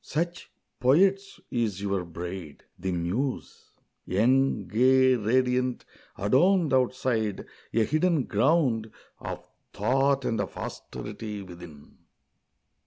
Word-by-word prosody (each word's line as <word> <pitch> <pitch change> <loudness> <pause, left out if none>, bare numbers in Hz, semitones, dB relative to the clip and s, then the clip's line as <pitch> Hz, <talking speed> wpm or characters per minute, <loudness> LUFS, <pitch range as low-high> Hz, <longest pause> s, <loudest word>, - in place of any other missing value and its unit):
Such, 170 +3 -3 0.3
poets, 195 +10 +3
is 110 -6 -1
your 100 -2 -1
bride, 85 -2 -7 0.2
the 95 +1 -2
Muse! 95 +11 -3 0.4
young, 120 +2 +2
gay, 130 +5 +4
Radiant, 125 +2 +1 0.3
adorned 155 - +3
outside; 125 -5 0 0.3
a 115 - +2
hidden 155 0 +2
ground 120 -1 +1 0.3
Of - - -7 0.3
thought 135 +5 +1
and 110 -2 0
of 95 - -6
austerity 105 -2 -6
within. 85 -5 -13
120 Hz, 100 wpm, -27 LUFS, 100-135 Hz, 0.4 s, gay